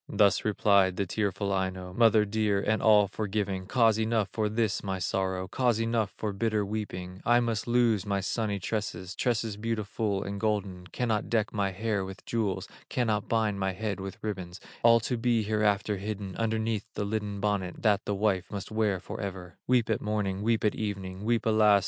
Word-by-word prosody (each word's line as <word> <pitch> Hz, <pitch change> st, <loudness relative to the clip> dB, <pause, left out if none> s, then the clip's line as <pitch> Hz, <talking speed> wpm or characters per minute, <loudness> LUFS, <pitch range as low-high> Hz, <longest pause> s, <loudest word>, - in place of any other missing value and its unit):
Thus 100 Hz, -1 st, +3 dB
replied 100 Hz, -3 st, +3 dB
the 100 Hz, -, -1 dB
tearful 100 Hz, +1 st, -1 dB
Aino: 95 Hz, -1 st, -2 dB
"Mother 110 Hz, 0 st, +5 dB
dear, 105 Hz, -1 st, +1 dB
and 110 Hz, +2 st, 0 dB
all 105 Hz, -2 st, +6 dB
forgiving, 100 Hz, -2 st, -2 dB
Cause 115 Hz, -3 st, +3 dB
enough 110 Hz, -3 st, +1 dB
for 110 Hz, -1 st, 0 dB
this 110 Hz, -2 st, 0 dB
my 95 Hz, -1 st, -2 dB
sorrow, 95 Hz, 0 st, -1 dB
Cause 120 Hz, -1 st, +1 dB
enough 115 Hz, -3 st, 0 dB
for 105 Hz, -2 st, -2 dB
bitter 105 Hz, 0 st, 0 dB
weeping: 95 Hz, -3 st, -5 dB
I 120 Hz, 0 st, +4 dB
must 115 Hz, -3 st, -1 dB
loose 120 Hz, -4 st, +3 dB
my 100 Hz, -1 st, -1 dB
sunny 105 Hz, +2 st, -1 dB
tresses, 95 Hz, -2 st, -3 dB
Tresses 115 Hz, -4 st, -1 dB
beautiful 105 Hz, -2 st, -2 dB
and 100 Hz, 0 st, -5 dB
golden, 100 Hz, -4 st, -2 dB
Cannot 110 Hz, 0 st, -1 dB
deck 110 Hz, -3 st, +1 dB
my 100 Hz, -2 st, +1 dB
hair 100 Hz, +1 st, -1 dB
with 95 Hz, 0 st, -9 dB
jewels, 110 Hz, -5 st, -1 dB, 0.2 s
Cannot 110 Hz, -4 st, 0 dB
bind 110 Hz, -3 st, +1 dB
my 95 Hz, 0 st, 0 dB
head 100 Hz, +1 st, -3 dB
with 95 Hz, -1 st, -6 dB
ribbons, 95 Hz, -4 st, -4 dB, 0.2 s
All 115 Hz, 0 st, +6 dB
to 125 Hz, +2 st, -1 dB
be 115 Hz, -1 st, +2 dB
hereafter 105 Hz, -1 st, +1 dB
hidden 100 Hz, -1 st, -5 dB
Underneath 110 Hz, -1 st, -1 dB
the 105 Hz, -, -1 dB
linen 105 Hz, -1 st, -3 dB
bonnet 100 Hz, -3 st, -2 dB
That 105 Hz, -3 st, +3 dB
the 100 Hz, -, -1 dB
wife 95 Hz, -3 st, +1 dB
must 100 Hz, 0 st, -6 dB
wear 110 Hz, -3 st, +1 dB
forever; 95 Hz, -3 st, -7 dB
Weep 125 Hz, -3 st, +3 dB
at 110 Hz, -, 0 dB
morning, 105 Hz, -2 st, -1 dB
weep 115 Hz, +1 st, +1 dB
at 105 Hz, -, +3 dB
evening, 95 Hz, -3 st, -4 dB
Weep 115 Hz, 0 st, +1 dB
alas! 110 Hz, -2 st, +5 dB
105 Hz, 180 wpm, -29 LUFS, 95-110 Hz, 0.2 s, all